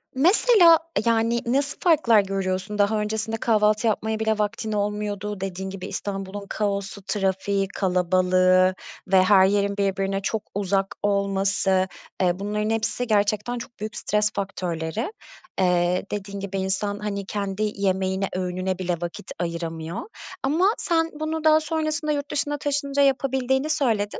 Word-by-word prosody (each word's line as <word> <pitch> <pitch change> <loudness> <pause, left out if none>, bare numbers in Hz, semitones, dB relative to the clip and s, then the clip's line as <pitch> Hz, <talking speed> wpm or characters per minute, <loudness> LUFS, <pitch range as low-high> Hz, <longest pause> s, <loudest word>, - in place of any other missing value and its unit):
Mesela, 345 - +6 0.3
yani, 230 0 +2
nasıl 275 +4 0
farklar 275 - +5
görüyorsun? 195 +1 -3
Daha 210 +1 +2
öncesinde 220 +1 -2
kahvaltı 215 0 +2
yapmaya 220 0 -1
bile 220 -1 +1
vaktin 215 +1 -2
olmuyordu. 210 -1 -2
Dediğin 190 0 -4
gibi 190 -1 -7
İstanbul'un 200 0 -5
kaosu, 200 -1 -2
trafiği, 195 0 0
kalabalığı 185 0 +3 0.3
ve 190 -1 +5
her 190 0 +6
yerin 200 +1 +1
birbirine 195 0 0
çok 215 +2 -2
uzak 195 0 0
olması. 195 -1 +1 0.4
E, 180 0 +1
bunların 210 +1 -2
hepsi 225 +2 -1
gerçekten 210 +2 +1
çok 235 0 -9
büyük 215 +2 -5
stres 210 -2 +1
faktörleri. 185 - -3 0.5
Eee, 180 0 +2
dediğin 200 -1 -5
gibi 195 0 -4
insan, 195 +2 -1
hani, 200 -2 -4
kendi 200 +1 -3
yemeğine, 190 0 0
öğününe 185 0 -2
bile 180 -1 -1
vakit 175 +2 -6
ayıramıyor 170 0 -4 0.4
ama 310 +7 +2
sen 330 -2 +1
bunu 315 0 -2
daha 310 0 +6
sonrasında 310 0 -1
yurt 290 -1 -3
dışına 290 0 -1
taşınınca 285 -1 0
yapabildiğini 265 +1 +1
söyledin. 220 -9 0
205 Hz, 135 wpm, -24 LUFS, 190-230 Hz, 0.5 s, Mesela